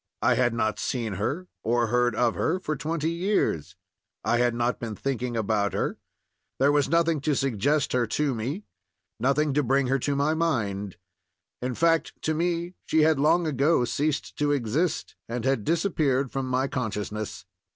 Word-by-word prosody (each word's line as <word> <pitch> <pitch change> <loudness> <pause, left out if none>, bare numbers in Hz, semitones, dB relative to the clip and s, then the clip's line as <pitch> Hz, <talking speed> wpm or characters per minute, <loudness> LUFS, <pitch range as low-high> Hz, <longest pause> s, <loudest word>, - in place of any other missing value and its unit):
I - - +5
had 120 -2 +2
not 110 -2 0
seen 115 -5 -2
her 170 - -2
or 120 +1 +2
heard 120 -1 +2
of 120 0 +2
her 180 +4 0
for 155 -4 -2
twenty 160 +3 -2
years; 170 - 0 0.5
I 120 - +2
had 120 -1 +2
not 120 +1 0
been 115 -3 -4
thinking 125 -2 -2
about 105 -2 0
her; - - -2 0.6
there 140 +2 +4
was 145 -2 +2
nothing 165 -2 +2
to 145 0 +1
suggest 135 +3 +1
her 125 -2 +2
to 145 +5 0
me, 130 - -3 0.6
nothing 140 +4 +2
to 150 - +3
bring 135 +1 +2
her 135 +1 +2
to 140 +3 -1
my 145 +3 +2
mind; 105 - -1 0.6
in 125 0 -2
fact, 165 -1 +2
to 155 - +1
me 170 +2 -1
she 160 -1 +4
had 155 -2 +3
long 165 +4 +3
ago 145 -2 +2
ceased 145 +4 -1
to 145 0 +2
exist, 145 +5 -1
and 120 0 -3
had 135 -5 +1
disappeared 150 - +1
from 135 -1 -2
my 130 +1 +1
consciousness. 110 -4 -4
135 Hz, 170 wpm, -26 LUFS, 120-155 Hz, 0.6 s, I